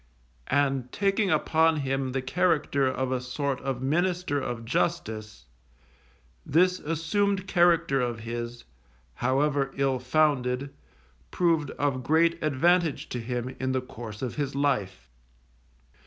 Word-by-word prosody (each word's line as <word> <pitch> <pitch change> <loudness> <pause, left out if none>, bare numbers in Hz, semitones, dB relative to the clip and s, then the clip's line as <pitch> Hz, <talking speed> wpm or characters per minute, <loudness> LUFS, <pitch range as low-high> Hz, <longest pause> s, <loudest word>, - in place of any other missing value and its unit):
And 135 -3 +1
taking 200 0 +1
upon 160 -3 +2
him 135 -1 -1
the 135 0 -2
character 150 -2 +1
of 130 0 -1
a 130 -1 0
sort 130 +1 -3
of 130 -2 -3
minister 175 +1 0
of 120 -3 -4
Justice, 110 -6 -2 1.0
this 180 - +3
assumed 185 +5 0
character 170 -6 +3
of 120 -2 -2
his, 120 +1 -5 0.5
however 140 0 +1
ill 135 -2 +1
founded, 135 -1 +1 0.6
proved 165 -5 +1
of 140 -3 0
great 165 +5 +2
advantage 165 +2 +2
to 125 - -3
him 125 +2 -4
in 130 0 -1
the 130 - +1
course 115 -3 -9
of 125 - -4
his 140 -2 -2
life. 105 - -1
135 Hz, 125 wpm, -27 LUFS, 125-165 Hz, 1.0 s, this